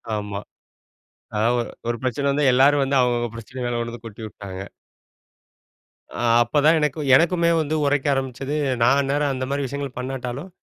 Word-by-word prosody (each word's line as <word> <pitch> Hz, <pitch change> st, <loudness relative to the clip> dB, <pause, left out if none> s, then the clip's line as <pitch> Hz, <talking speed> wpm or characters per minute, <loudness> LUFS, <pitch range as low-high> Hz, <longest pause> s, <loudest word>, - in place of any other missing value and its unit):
ஆமா. 105 Hz, -1 st, -4 dB, 1.0 s
அதா 105 Hz, +2 st, +2 dB, 0.4 s
ஒரு 120 Hz, 0 st, -1 dB
பிரச்சனை 130 Hz, +3 st, -1 dB
வந்து 145 Hz, +2 st, 0 dB
எல்லாரும் 140 Hz, +3 st, +5 dB
வந்து 135 Hz, +1 st, +1 dB
அவுங்க 125 Hz, -1 st, +2 dB
அவுங்க 120 Hz, 0 st, -2 dB
பிரச்சனை 115 Hz, +3 st, -9 dB
மேல 120 Hz, 0 st, -1 dB
கொண்டு 115 Hz, 0 st, -3 dB
வந்து 120 Hz, 0 st, -10 dB
கொட்டி 110 Hz, 0 st, -11 dB
உட்டாங்க. 95 Hz, -2 st, -8 dB, 1.5 s
ஆ -, -, -4 dB, 0.2 s
அப்பதான் 145 Hz, +7 st, +3 dB
எனக்கு 150 Hz, 0 st, -1 dB, 0.2 s
எனக்குமே 170 Hz, +2 st, +3 dB
வந்து 155 Hz, +1 st, -2 dB
உரைக்க 145 Hz, 0 st, +1 dB
ஆரம்பிச்சது. 135 Hz, +1 st, -3 dB, 0.3 s
நான் 135 Hz, +4 st, +5 dB
அந்நேரம் 140 Hz, +1 st, 0 dB
அந்தமாரி 135 Hz, +2 st, -2 dB
விஷயங்கள் 140 Hz, 0 st, -5 dB
பண்ணாட்டாலும், 130 Hz, +5 st, -5 dB
135 Hz, 150 wpm, -22 LUFS, 120-145 Hz, 1.5 s, எல்லாரும்